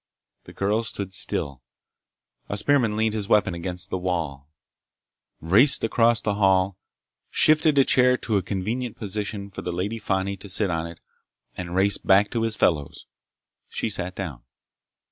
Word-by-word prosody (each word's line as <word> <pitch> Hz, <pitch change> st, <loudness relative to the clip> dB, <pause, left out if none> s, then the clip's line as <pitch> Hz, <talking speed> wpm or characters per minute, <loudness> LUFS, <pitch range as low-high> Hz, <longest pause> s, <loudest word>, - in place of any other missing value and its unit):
The -, -, -12 dB
girl 105 Hz, +3 st, 0 dB
stood 100 Hz, -4 st, -4 dB
still. 70 Hz, -8 st, -1 dB, 0.9 s
A 100 Hz, -, -2 dB
spearman 115 Hz, -2 st, +2 dB
leaned 110 Hz, 0 st, +1 dB
his 105 Hz, -2 st, -2 dB
weapon 105 Hz, -4 st, +3 dB
against 90 Hz, +1 st, -5 dB
the 95 Hz, -, -1 dB
wall, 80 Hz, -6 st, -3 dB, 0.9 s
raced 115 Hz, -, +3 dB
across 115 Hz, +1 st, +3 dB
the 105 Hz, -, -1 dB
hall, 95 Hz, -2 st, +2 dB, 0.5 s
shifted 155 Hz, -1 st, +4 dB
a 135 Hz, -, +7 dB
chair 125 Hz, 0 st, +4 dB
to 110 Hz, -5 st, -1 dB
a -, -, +1 dB
convenient 105 Hz, +6 st, -3 dB
position 100 Hz, -1 st, -4 dB
for -, -, -7 dB
the -, -, -4 dB
Lady 100 Hz, +6 st, -3 dB
Fani 95 Hz, -1 st, -1 dB
to 100 Hz, +1 st, -10 dB
sit 95 Hz, 0 st, +1 dB
on 80 Hz, 0 st, -2 dB
it, 85 Hz, 0 st, -11 dB, 0.6 s
and 90 Hz, -1 st, -6 dB
raced 95 Hz, +1 st, +2 dB
back 100 Hz, +2 st, +5 dB
to 115 Hz, -, -1 dB
his 115 Hz, -1 st, 0 dB
fellows. 75 Hz, -6 st, 0 dB, 0.6 s
She 110 Hz, -, -2 dB
sat 95 Hz, -2 st, -4 dB
down. 75 Hz, -11 st, -6 dB
100 Hz, 160 wpm, -24 LUFS, 90-110 Hz, 0.9 s, a